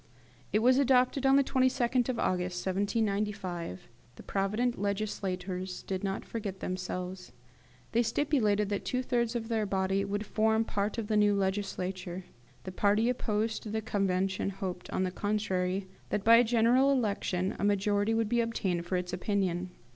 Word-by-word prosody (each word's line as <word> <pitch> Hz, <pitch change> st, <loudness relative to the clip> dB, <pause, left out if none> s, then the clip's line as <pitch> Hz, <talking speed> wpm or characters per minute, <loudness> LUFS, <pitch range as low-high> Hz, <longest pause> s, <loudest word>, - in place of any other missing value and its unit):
It 215 Hz, +2 st, +2 dB
was 255 Hz, +2 st, +5 dB
adopted 265 Hz, 0 st, +3 dB
on 270 Hz, -, +6 dB
the 280 Hz, -, +5 dB
22d 255 Hz, -1 st, +1 dB
of 250 Hz, -, -1 dB
August 180 Hz, -2 st, -1 dB
1795. 200 Hz, -, -2 dB, 0.3 s
The -, -, -12 dB
provident 210 Hz, +4 st, -1 dB
legislators 190 Hz, -3 st, -3 dB
did 190 Hz, 0 st, -4 dB
not 195 Hz, -1 st, -2 dB
forget 205 Hz, -4 st, -5 dB
themselves. 185 Hz, -3 st, -5 dB, 0.6 s
They 235 Hz, -, +3 dB
stipulated 225 Hz, -5 st, +1 dB
that 205 Hz, -1 st, -2 dB
two 255 Hz, 0 st, -1 dB
thirds 240 Hz, -2 st, 0 dB
of 225 Hz, -1 st, -2 dB
their 220 Hz, -2 st, 0 dB
body 190 Hz, 0 st, +1 dB
should 205 Hz, +2 st, -3 dB
form 220 Hz, +2 st, +2 dB
part 205 Hz, +1 st, -2 dB
of 230 Hz, -, -2 dB
the 215 Hz, 0 st, +1 dB
new 205 Hz, -1 st, +4 dB
legislature. 190 Hz, -2 st, -2 dB, 0.4 s
The 185 Hz, -, -6 dB
party 205 Hz, +5 st, +2 dB
opposed 220 Hz, -2 st, -1 dB
to 215 Hz, -, -7 dB
the 220 Hz, +1 st, -2 dB
Convention 195 Hz, -2 st, 0 dB
hoped, 190 Hz, -2 st, -5 dB
on 185 Hz, -, 0 dB
the 185 Hz, -, -1 dB
contrary, 190 Hz, -2 st, -1 dB, 0.2 s
that, 205 Hz, -, -1 dB
by 230 Hz, +2 st, +8 dB
a 240 Hz, -, +6 dB
general 245 Hz, +4 st, +4 dB
election, 200 Hz, -7 st, 0 dB
a -, -, -2 dB
majority 205 Hz, +2 st, +2 dB
would 225 Hz, -1 st, +1 dB
be 235 Hz, +2 st, +2 dB
obtained 190 Hz, -7 st, -2 dB
for 185 Hz, -, 0 dB
its 180 Hz, 0 st, -4 dB
opinion. 185 Hz, -2 st, -1 dB
205 Hz, 160 wpm, -30 LUFS, 190-225 Hz, 0.6 s, by